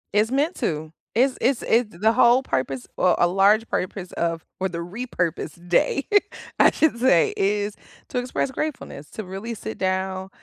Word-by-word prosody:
It's 210 +3 +2
meant 290 +6 +1
to, 155 0 -3 0.2
it's 255 +3 +3
it's 260 -1 +2
it's 225 -6 +1
the 220 +5 +3
whole 245 +1 +5
purpose, 130 - -2
or 185 - +3
a 175 - +4
large 200 +5 +3
purpose 185 0 -3
of 165 -1 -2
or 190 - 0
the 170 -1 -5
repurpose 180 -4 -3
day, 270 +9 +2 0.5
I - - +7
should 310 -6 +2
say, 235 -9 +4
is 205 +1 0 0.3
to 250 - -1
express 250 +2 -2
gratefulness, 265 - -5
to 220 - -6
really 195 +5 -6
sit 220 0 -7
down, 190 0 -2
205 Hz, 165 wpm, -23 LUFS, 180-245 Hz, 0.5 s, I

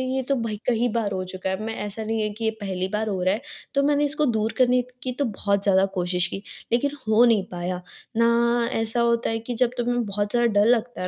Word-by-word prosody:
ये 265 - +1
तो 275 +2 0
भई 230 -3 -2
कई 240 0 +2
बार 215 -2 -1
हो 185 -1 -2
चुका 185 +1 -5
है। 190 +2 -2
मैं 225 - -3
ऐसा 215 +2 -5
नहीं 220 0 -1
है 210 - 0
कि 225 +2 -8
ये 220 - +2
पहली 190 -2 -2
बार 215 +1 -1
हो 190 -2 -2
रहा 185 - +3
है। 215 - -3 0.3
तो 280 - +3
मैंने 290 +1 +3
इसको 300 +1 +1
दूर 220 -3 0
करने 250 -1 +4 0.2
की 255 - -2
तो 285 - +2
बहुत 200 -3 -1
ज़्यादा 195 -1 +4
कोशिश 180 0 +1
की 195 - -6 0.3
लेकिन 245 +4 +2 0.2
हो 220 +2 +5
नहीं 225 -5 +4
पाया। 180 +1 -3 0.4
ना 235 0 +3
ऐसा 225 +1 0
होता 235 0 +2
है 225 0 -1
कि 235 +2 -5
जब 240 0 +2
तुम्हें 245 0 0
बहुत 205 0 -2
ज़्यादा 240 0 +3
डर 205 - +5
लगता 240 -3 +1
है 180 - -1
225 Hz, 250 wpm, -24 LUFS, 200-240 Hz, 0.4 s, हो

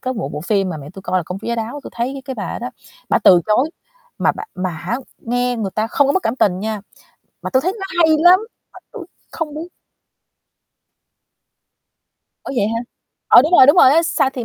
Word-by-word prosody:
có 255 - -3
một 215 - -4
bộ 150 - -5
phim 195 +2 0
mà 165 - -4
mẹ 145 0 -10
tui 190 +1 -12
coi 185 -1 0
là - - -2
Công 180 +1 -5
chúa 220 - -10
giá 235 - 0
đáo, 230 +5 -5
tui - - -9
thấy 260 +3 -3
cái 265 -2 -5
bà - - -5
đó - - -5
đó, - - -5 0.4
bả - - +3
từ 180 -2 +7
chối 250 +9 +2 0.5
mà - - +2
bả 415 - -7
mà 185 0 -3
hả 175 +8 -4 0.2
nghe 245 +1 -1
người 205 -4 -3
ta 215 +1 0
không 280 +4 +2
có 280 - +2
mất 380 - 0
cảm 230 +3 -1
tình 185 -5 +1
nha, 215 -1 -3 0.6
mà - - -4
tui 260 0 +2
thấy 370 +3 -1
nó 385 - -4 0.2
hay 315 -1 +5
lắm, 355 +3 +6 0.3
mà - - -13
tui - - -9 0.3
không 310 -3 -5
biết 320 +3 -6 2.8
Ủa, - - -5
vậy 205 - +2
hả? 230 +1 -2 0.5
Ờ, - - +8
đúng 315 +4 -2
rồi, 260 - +8
đúng 290 - +6
rồi 260 - +7
á, 330 +3 +4
Xa 275 -4 +1
Thi 250 -4 -6
240 Hz, 235 wpm, -18 LUFS, 195-285 Hz, 2.8 s, Ờ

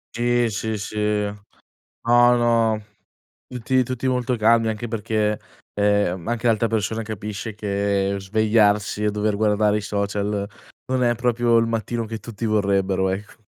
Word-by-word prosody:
Sì, 120 0 +2
sì, 110 +1 -3
sì. 105 +1 -7 1.1
No, 120 +1 +6
no, 115 -2 +2 0.7
tutti 125 +1 0
tutti 130 +1 -3
molto 125 -1 0
calmi, 115 +1 +3
anche 110 +2 -4
perché, 110 -1 -1 0.4
ehm, 100 -4 +1
anche 120 0 -1
l'altra 115 0 +2
persona 110 +1 -1
capisce 105 0 -6
che 100 -1 -1
svegliarsi 105 +1 +1
e 105 - +2
dover 105 0 0
guardare 105 0 +2
i 105 - -3
social 100 0 -2 0.4
non 130 -1 0
è 120 0 +2
proprio 120 0 +2
il 115 0 +2
mattino 115 +1 -2
che 110 0 -6
tutti 115 0 -6
vorrebbero, 100 -3 +1
ecc 100 +4 -5
110 Hz, 145 wpm, -22 LUFS, 105-115 Hz, 1.1 s, No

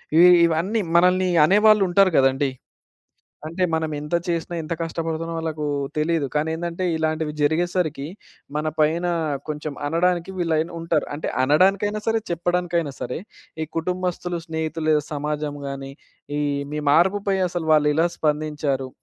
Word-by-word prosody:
ఇవి 175 +2 +8 0.2
ఇవన్నీ 170 +7 0
మనల్ని 180 +1 +4 0.2
అనేవాళ్ళుంటారు 195 -1 +4
గదండీ. 135 +1 +2 1.0
అంటే 170 +4 -2
మనమెంత 155 0 -2
చేసినా, 170 0 -2
ఎంత 155 - -3
కష్టపడుతున్నామో 165 0 -3
ఆళ్ళకు 155 -2 -3 0.3
తెలీదు. 155 -1 +1
కానీ 150 +2 +1
ఏందంటే 170 +2 -4
ఇలాంటివి 155 -1 -1
జరిగేసరికి, 160 -1 0 0.5
మన 150 +1 -1
పైన 160 +3 +2 0.4
కొంచెం 150 0 -4
అనడానికి 175 +3 0
వీళైన 165 -1 0
ఉంటారు. 165 -2 0
అంటే 155 - -3
అనడానికైనా 195 +9 +2
సరే, 225 0 +2
చెప్పడానికైనా 170 -3 -1
సరే 125 - -3 0.4
ఈ - - -4
కుటుంబస్తులు, 180 0 -2
స్నేహితులు 160 0 -3
లేదా 150 -1 +2
సమాజం 150 0 -3
గాని, 135 0 -6 0.5
ఈ - - 0 0.3
మీ 150 - -2
మార్పుపై 195 +5 +3
అసలు 175 -2 -4
వాళ్ళెలా 150 +2 +3
స్పందించారు? 150 -3 -1
160 Hz, 125 wpm, -23 LUFS, 150-175 Hz, 1.0 s, ఇవి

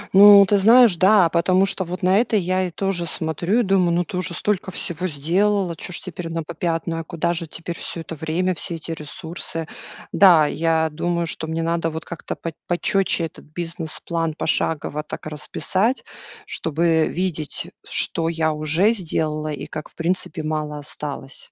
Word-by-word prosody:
Ну, 200 0 +9
ты 205 +1 +3
знаешь, 230 0 +7
да, 190 -1 +5
потому 185 +3 +3
что 195 -1 -1
вот, 180 +2 -6
на 185 +2 +4
это 230 -1 +1
я 185 0 0
и - - -5
тоже 175 0 -2
смотрю 170 +8 0
и - - +1
думаю: 190 -4 +2
"Ну 175 0 +1
ты - - -7
уже 180 -2 +1
столько 195 0 -1
всего 180 -1 -3
сделала, 180 +4 0
чё 180 - -3
ж - - -3
теперь 175 -2 -6
на 165 -1 -3
попятную, 165 0 -3
а - - -8
куда 170 +1 -1
же 170 -1 -3
теперь 170 +2 -6
всё 165 - -5
это 165 - -8
время, 165 +4 -1
все 170 +1 -6
эти 165 0 -7
ресурсы!". 160 +1 -5 0.4
Да, 175 -6 +6
я 160 +1 +1
думаю, 170 +2 -1
что 160 -1 -2
мне 165 +1 -2
надо 165 0 0
вот 160 0 -6
как-то 170 - -6
пот 165 -1 -6
почётче 175 0 +1
этот 160 - -10
бизнес-план 165 0 -4
пошагово 150 -2 0
так 150 - -8
расписать, 185 - -1 0.4
чтобы 160 0 +1
видеть, 170 -4 -3
что 165 0 +2
я 160 -1 0
уже 155 +9 +2
сделала 155 -5 -1
и 145 - -5
как 155 -1 -7
в - - -21
принципе 170 -1 -2
мало 155 -1 -3
осталось. 145 -1 -7
170 Hz, 175 wpm, -22 LUFS, 160-185 Hz, 0.4 s, Ну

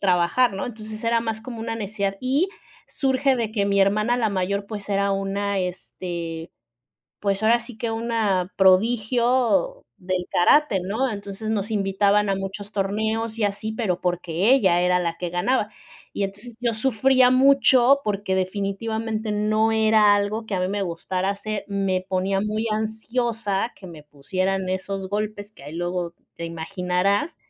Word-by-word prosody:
trabajar, 190 +6 +3
¿no? 195 - -4
Entonces, 220 -2 -8
era 230 0 +2
más 225 -1 -3
como 230 -1 -8
una 225 0 -3
necesidad. 200 -2 -2
Y 275 +8 +1 0.4
surge 270 -1 +1
de 225 -2 -2
que 205 -3 +1
mi 200 0 +2
hermana, 215 +5 +2
la 230 -3 +1
mayor, 200 +1 -1
pues, 205 -1 -7
era 200 0 +1
una, 195 +1 -1
este, 175 -2 -5 0.7
pues, 200 0 0
ahora 230 +2 +4
sí 235 -1 -11
que 230 - -2
una 225 -5 0
prodigio 240 - +3
del 180 -1 -2
karate, 205 +1 +4
¿no? 225 +8 -1
Entonces 200 +1 -6
nos 210 0 -1
invitaban 200 0 +2
a - - +2
muchos 195 +2 -6
torneos 220 +3 -1
y 220 - +1
así, 205 +2 -2
pero 200 -6 -1
porque 175 +4 +1
ella 185 -9 +3
era 180 0 +3
la 170 -1 -2
que 175 - -3
ganaba. 210 +6 0 0.5
Y 200 - 0
entonces 210 +4 -8
yo 235 -2 +1
sufría 255 +2 +3
mucho 270 0 +5
porque 205 -3 -1
definitivamente 215 +3 -2
no 215 +1 +2
era 220 -1 +5
algo 215 +2 -2
que 205 - -3
a 180 - 0
mí 185 - 0
me 200 +1 -2
gustara 185 +1 -2
hacer, 205 +1 -4
me 195 -2 0
ponía 190 +1 0
muy 215 +2 -1
ansiosa 220 -1 -1
que 190 - -11
me 160 -3 -11
pusieran 185 +7 -2
esos 190 +1 -3
golpes 210 0 -3
que 140 - -17
ahí 150 +3 -8
luego 175 0 -3 0.2
te 170 - -5
imaginarás, 180 - -1
205 Hz, 160 wpm, -23 LUFS, 190-225 Hz, 0.7 s, mucho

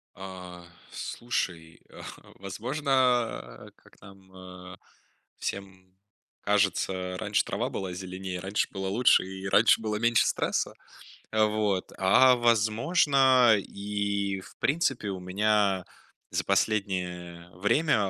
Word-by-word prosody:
Э, 90 -2 -9 0.3
слушай, 85 -9 -4
а, - - -12 0.4
возможно, 125 +10 -5
а, 125 -3 0
как - - -23
нам, 95 -1 -16
э, 90 -1 -11 0.6
всем 95 -2 -7 0.5
кажется, 100 -2 +1
э, 90 0 -4
раньше - - 0
трава - - -3
была 95 -2 -4
зеленее, 95 0 -6
раньше 100 +3 -1
было 95 0 -4
лучше, 115 +2 +4
и 95 +1 -7
раньше 110 +3 +4
было 105 -1 -2
меньше 115 +1 +3
стресса. - - -1 0.6
Вот. 105 -3 0
А, 125 +7 +5
возможно, 120 +2 +4
и 100 -1 -3
в - - -16
принципе, 135 -8 0
у 95 - -4
меня 100 0 +1 0.5
за - - -1
последнее, 90 -4 -1
э, 90 - -19
время, 115 - +2
100 Hz, 115 wpm, -27 LUFS, 95-115 Hz, 0.6 s, А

